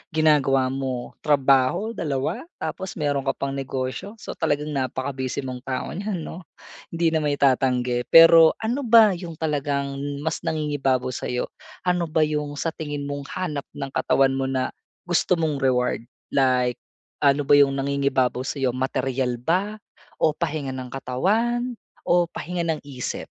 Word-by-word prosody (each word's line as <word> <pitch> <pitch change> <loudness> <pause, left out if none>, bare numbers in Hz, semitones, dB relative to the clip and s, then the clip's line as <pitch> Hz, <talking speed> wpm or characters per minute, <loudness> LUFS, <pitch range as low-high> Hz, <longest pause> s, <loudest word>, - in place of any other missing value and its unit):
ginagawa 135 -4 +3
mo, 130 -2 -4
trabaho, 140 - +3
2? 155 - -3
Tapos 190 0 -5
meron 145 -4 -1
ka - - +1
pang 140 0 -3
negosyo, 135 - -4
so - - -8
talagang 150 +1 0
napaka-busy 130 0 -3
mong 130 -1 -5
tao 130 -1 -3
niyan, 195 -3 -3
'no? 175 0 -9 0.5
Hindi 165 -1 +2
na 160 - +2
mai-tatanggi, 130 -4 +1
pero 165 -1 +8
ano 245 +3 -1
ba 225 -2 +7
'yong 170 -2 -6
talagang 140 -3 -2 0.2
mas 160 -1 -1
nangingibabaw 140 -5 0
sa'yo? 125 0 -3 0.3
Ano 180 -2 +1
ba 155 0 +2
'yong 150 -1 -2
sa 160 +4 -2
tingin 145 -3 -5
mong 140 0 -5
hanap 155 -7 -3
ng 140 -1 -5
katawan 135 0 +2
mo 135 0 -1
na, 130 -1 -1 0.3
gusto 175 +1 +2
mong 155 -4 -1
reward? 125 -3 0 0.2
Like, 125 -2 +2 0.4
ano 140 0 +3
ba 145 - +7
'yong 140 -1 +6
nangingibabaw 135 -2 0
sa 140 +1 -4
'yo, 130 -2 0
materyal 130 -1 -1
ba 195 - -1 0.4
o 155 -1 +2
pahinga 150 -5 -3
ng 130 -1 -7
katawan, 220 - 0 0.3
o 175 -1 +3
pahinga 170 0 -4
ng 160 -2 -1
isip? 135 -3 -5
140 Hz, 150 wpm, -24 LUFS, 130-165 Hz, 0.5 s, pero